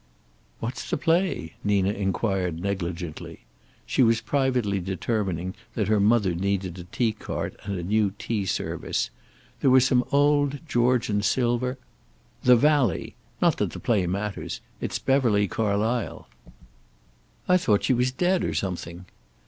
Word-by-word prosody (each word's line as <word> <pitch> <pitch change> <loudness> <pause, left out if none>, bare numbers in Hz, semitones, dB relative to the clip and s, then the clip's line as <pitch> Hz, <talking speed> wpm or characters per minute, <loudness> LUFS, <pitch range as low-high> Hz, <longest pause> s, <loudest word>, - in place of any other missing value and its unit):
"What's 120 +3 -5
the - - 0
play?" 165 - 0
Nina 100 -1 +2
inquired 95 -3 -1
negligently. 90 -6 -4 0.4
She - - +1
was 115 -2 +4
privately 125 -8 0
determining 95 -1 -2 0.2
that 105 -3 0
her 110 -1 +3
mother 100 -3 +3
needed 95 0 -2
a 85 - -8
tea 115 +5 0
cart 110 - -5
and 100 -2 -3
a 85 - -4
new 105 +2 +2
tea 105 -4 -2
service. - - -2 0.5
There 135 - +3
were 130 +1 +7
some 125 0 +3
in - - -10
old 145 0 +3
Georgian 120 -5 +2
silver 120 +4 +1 0.7
"'The 125 0 +7
Valley.' 145 0 +2 0.3
Not - - +4
that - - -1
the - - -6
play 100 -7 +1
matters. 100 +3 -3 0.2
It's - - -2
Beverly 120 -7 +2
Carlysle." 110 +3 -1 1.2
"I 180 - +5
thought 105 - +2
she 130 - +3
was 125 +1 +1
dead, 180 +7 +1
or - - -2
something." 90 -1 -4
105 Hz, 140 wpm, -25 LUFS, 95-125 Hz, 1.2 s, were